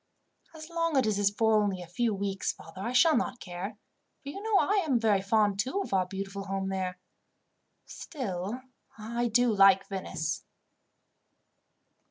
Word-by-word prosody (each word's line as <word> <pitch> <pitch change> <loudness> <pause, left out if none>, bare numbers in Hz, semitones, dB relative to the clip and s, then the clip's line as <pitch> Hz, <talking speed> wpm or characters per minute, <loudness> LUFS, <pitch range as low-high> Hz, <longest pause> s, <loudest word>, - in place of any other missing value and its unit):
"As 310 -1 -9
long 335 -3 0
as 260 - +3
it 210 -2 0
is 200 -1 +4
for 220 +1 +3
only 200 -3 -1
a 180 - -7
few 225 +7 0
weeks, 195 -1 -2
father, 190 - -11
I 235 - -2
shall 315 +5 +5
not 245 0 -1
care; 190 +4 -6 0.5
for 280 - -6
you 390 +8 -7
know 435 -1 +2
I 400 -1 +2
am 270 -7 +1
very 210 -4 +2
fond, 205 0 +2
too, 260 - 0
of - - -7
our 185 -2 +2
beautiful 195 +1 -5
home 195 0 -2
there. 185 -1 -3 0.9
Still, 215 - -5 0.4
I 235 +2 -2
do 240 0 +3
like 195 -1 +5
Venice." 175 -4 -3
205 Hz, 165 wpm, -29 LUFS, 195-245 Hz, 0.9 s, shall